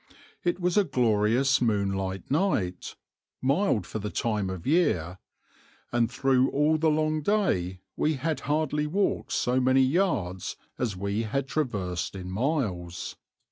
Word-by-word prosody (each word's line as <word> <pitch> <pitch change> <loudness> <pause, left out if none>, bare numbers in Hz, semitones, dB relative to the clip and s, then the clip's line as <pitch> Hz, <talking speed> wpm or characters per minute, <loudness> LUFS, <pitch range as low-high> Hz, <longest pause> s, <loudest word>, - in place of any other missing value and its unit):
It 175 +1 0
was 180 +2 +1
a 205 - +6
glorious 125 - +2
moonlight 95 -4 -1
night, 125 - 0 0.4
mild 135 - +1
for 110 - -5
the 105 +1 -4
time 105 -3 -1
of 95 -3 -6
year, 105 - +1 0.7
and 120 -2 +2
through 135 -1 +2
all 150 +2 +2
the 160 0 +3
long 155 0 +1
day 95 - 0
we 155 0 +1
had 145 +1 -2
hardly 150 +1 0
walked 195 +6 0
so 125 +1 +1
many 130 +1 +4
yards 130 - 0 0.2
as 110 -7 -1
we 100 +3 -1
had 135 +5 -2
traversed 95 - -2
miles. 95 - -2
125 Hz, 135 wpm, -27 LUFS, 95-155 Hz, 0.7 s, a